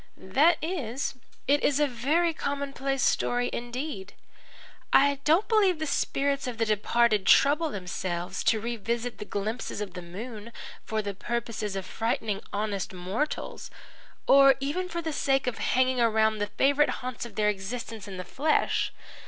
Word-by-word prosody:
"That 295 Hz, -, +3 dB
is. 285 Hz, -7 st, -2 dB, 0.3 s
It 285 Hz, +2 st, +3 dB
is 285 Hz, 0 st, +3 dB
a 295 Hz, -, +4 dB
very 295 Hz, +7 st, +1 dB
commonplace 275 Hz, -2 st, -2 dB
story 245 Hz, 0 st, +1 dB
indeed. 240 Hz, -4 st, -5 dB, 0.8 s
I 280 Hz, 0 st, +5 dB
don't 330 Hz, +8 st, +4 dB
believe 405 Hz, -6 st, +3 dB
the 315 Hz, -, -3 dB
spirits 280 Hz, -1 st, 0 dB
of 245 Hz, -2 st, -4 dB
the 225 Hz, -, +1 dB
departed 215 Hz, 0 st, +2 dB
trouble 300 Hz, +3 st, +5 dB
themselves 180 Hz, -4 st, -4 dB
to 220 Hz, -, +3 dB
revisit 235 Hz, +1 st, -3 dB
the 210 Hz, -, -5 dB
glimpses 210 Hz, +3 st, -3 dB
of 205 Hz, -3 st, -5 dB
the 180 Hz, -, -6 dB
moon 215 Hz, +5 st, -8 dB, 0.3 s
for 220 Hz, -1 st, -2 dB
the 200 Hz, -1 st, -3 dB
purpose 235 Hz, +3 st, -4 dB
of 190 Hz, -1 st, -4 dB
frightening 220 Hz, -1 st, -2 dB
honest 200 Hz, -2 st, -2 dB
mortals 185 Hz, +11 st, -3 dB, 0.6 s
or 275 Hz, 0 st, +7 dB
even 325 Hz, +7 st, -2 dB
for 340 Hz, -1 st, -4 dB
the 320 Hz, -1 st, -3 dB
sake 270 Hz, -1 st, +1 dB
of 250 Hz, -3 st, -2 dB
hanging 255 Hz, 0 st, +2 dB
around 220 Hz, -1 st, +3 dB
the 205 Hz, -, 0 dB
favourite 285 Hz, +6 st, +3 dB, 0.2 s
haunts 255 Hz, -2 st, -4 dB
of 235 Hz, -4 st, -9 dB
their 210 Hz, -1 st, +2 dB
existence 210 Hz, +1 st, -5 dB
in 190 Hz, -2 st, -7 dB
the 185 Hz, -, -4 dB
flesh. 295 Hz, -, +1 dB
240 Hz, 155 wpm, -27 LUFS, 210-280 Hz, 0.8 s, or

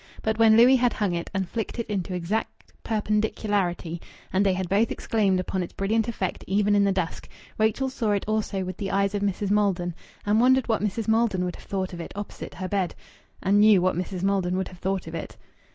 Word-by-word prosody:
But 220 Hz, 0 st, 0 dB
when 220 Hz, -1 st, +6 dB
Louis 250 Hz, +3 st, +7 dB
had 245 Hz, -2 st, +2 dB
hung 200 Hz, -4 st, 0 dB
it 170 Hz, 0 st, -3 dB
and 190 Hz, -2 st, -2 dB
flicked 225 Hz, +3 st, -4 dB
it 235 Hz, -, -2 dB
into 190 Hz, -3 st, -3 dB
exact 180 Hz, +6 st, -3 dB
perpendicularity, 205 Hz, -5 st, -1 dB, 0.3 s
and 190 Hz, +2 st, +3 dB
they 195 Hz, -2 st, +3 dB
had 185 Hz, 0 st, -2 dB
both 205 Hz, +5 st, +2 dB
exclaimed 200 Hz, -4 st, +1 dB
upon 185 Hz, +1 st, -2 dB
its 175 Hz, -, -5 dB
brilliant 220 Hz, +3 st, 0 dB
effect 205 Hz, -5 st, -3 dB
even 205 Hz, +2 st, +2 dB
in 200 Hz, -1 st, +4 dB
the 200 Hz, -, +3 dB
dusk, 185 Hz, -4 st, -3 dB, 0.3 s
Rachel 220 Hz, +5 st, +2 dB
saw 245 Hz, -4 st, -2 dB
it 200 Hz, -, -1 dB
also 215 Hz, -3 st, -1 dB
with 185 Hz, 0 st, -5 dB
the 195 Hz, -, -3 dB
eyes 195 Hz, 0 st, +1 dB
of 205 Hz, -, -1 dB
Mrs. 200 Hz, 0 st, -1 dB
Maldon, 195 Hz, -4 st, +1 dB, 0.3 s
and 210 Hz, +2 st, +3 dB
wondered 260 Hz, +1 st, +4 dB
what 225 Hz, -3 st, +1 dB
Mrs. 210 Hz, +2 st, -2 dB
Maldon 220 Hz, -5 st, +2 dB
would 180 Hz, -, -4 dB
have -, -, -15 dB
thought 190 Hz, -2 st, -3 dB
of 170 Hz, -, -5 dB
it -, -, -8 dB
opposite 205 Hz, 0 st, -7 dB
her 185 Hz, -, -4 dB
bed, 190 Hz, -2 st, -1 dB, 0.5 s
and 200 Hz, +2 st, +4 dB
knew 210 Hz, -2 st, +7 dB
what 185 Hz, -1 st, +1 dB
Mrs. 180 Hz, +1 st, -4 dB
Maldon 190 Hz, -2 st, +1 dB
would 190 Hz, -, -2 dB
have 180 Hz, -, -14 dB
thought 190 Hz, 0 st, -2 dB
of 160 Hz, -, -8 dB
it. 165 Hz, -, -6 dB
200 Hz, 220 wpm, -25 LUFS, 185-215 Hz, 0.5 s, Louis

